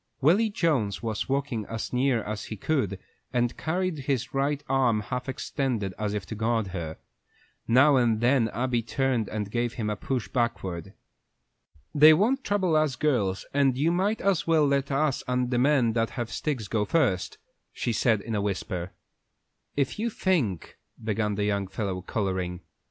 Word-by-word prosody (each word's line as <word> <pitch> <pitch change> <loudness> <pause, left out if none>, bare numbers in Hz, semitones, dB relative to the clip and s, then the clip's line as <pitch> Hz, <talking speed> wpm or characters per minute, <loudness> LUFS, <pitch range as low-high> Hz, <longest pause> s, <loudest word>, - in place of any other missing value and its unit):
Willy 185 - +4
Jones 140 - 0
was 110 +1 -2
walking 135 -5 -1
as 115 +1 -5
near 125 -3 +2
as 105 0 -5
he 110 - -6
could, 105 - 0 0.3
and 120 -1 +1
he - - -17
carried 180 0 -1
his 130 -2 -2
right 140 +1 0
arm 125 -5 +2
half 125 +4 -4
extended, 125 -7 -2
as 105 -1 -1
if 100 -3 -3
to 95 - -6
guard 110 -1 0
her. 85 -4 -5 0.7
Now 130 +4 +6
and 115 -3 +2
then 120 0 +3
Abby 120 +2 0
turned 125 -1 0
and 105 -2 -4
gave 120 0 -1
him 105 -3 -2
a - - -1
push 125 +3 -3
backward. 95 -8 -2 1.0
"They 155 +1 +8
won't 250 - +2
trouble 190 -5 +1
us 155 -3 +2
girls, 115 -10 0
and 135 -2 +3
you 155 +5 +2
might 195 +5 0
as 195 -4 +1
well 160 -2 +4
let 140 -1 +1
us 140 0 +1
and 125 0 0
the 120 - +2
men 130 -4 +3
that 115 0 +1
have 120 -2 -5
sticks 130 -9 -2
go 105 -1 0
first," 105 - +1 0.3
she 120 - -2
said 110 -2 +2
in 115 +2 -5
a 105 - 0
whisper. 90 -3 -3 0.8
"If 140 +7 0
you 235 +2 0
think 150 - -1
" - - -21
began 105 -1 0
the 105 - -1
young 100 -2 0
fellow, 95 -1 -3
coloring. 95 -3 -2
120 Hz, 175 wpm, -27 LUFS, 105-140 Hz, 1.0 s, They